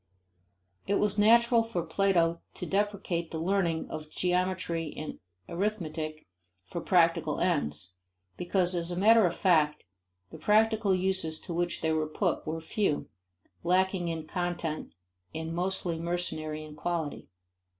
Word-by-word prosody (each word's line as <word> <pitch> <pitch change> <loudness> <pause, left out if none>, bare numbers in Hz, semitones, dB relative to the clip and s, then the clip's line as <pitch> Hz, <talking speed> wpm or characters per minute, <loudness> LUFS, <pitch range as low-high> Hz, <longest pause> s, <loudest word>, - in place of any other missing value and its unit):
It 200 - +2
was 210 0 +1
natural 235 +2 +6
for 225 -7 -2
Plato 170 -1 +2
to - - -5
deprecate 195 -4 -1
the 160 - -5
learning 170 -1 0
of 155 -1 -6
geometry 180 -2 -1
and 155 - -6 0.3
arithmetic 165 -5 -3 0.4
for 170 - -5
practical 165 -4 +3
ends, 90 - -1 0.4
because 180 0 +1
as 170 0 -2
matter 215 +2 +6
of 170 - -3
fact 155 -6 +3 0.5
the - - -10
practical 215 -2 +3
uses 185 -4 0
to 175 - -5
which 175 +1 -1
they 160 - +1
were 155 -1 0
put 170 +2 -1
were 160 +1 -2
few, 160 -1 -1 0.5
lacking 185 0 +2
in 165 -2 -3
content 175 -3 -3 0.4
and 160 +1 -4
mostly 180 -1 -1
mercenary 160 -3 -3
in 150 -1 -11
quality. 165 -1 -3
175 Hz, 130 wpm, -29 LUFS, 160-190 Hz, 0.5 s, natural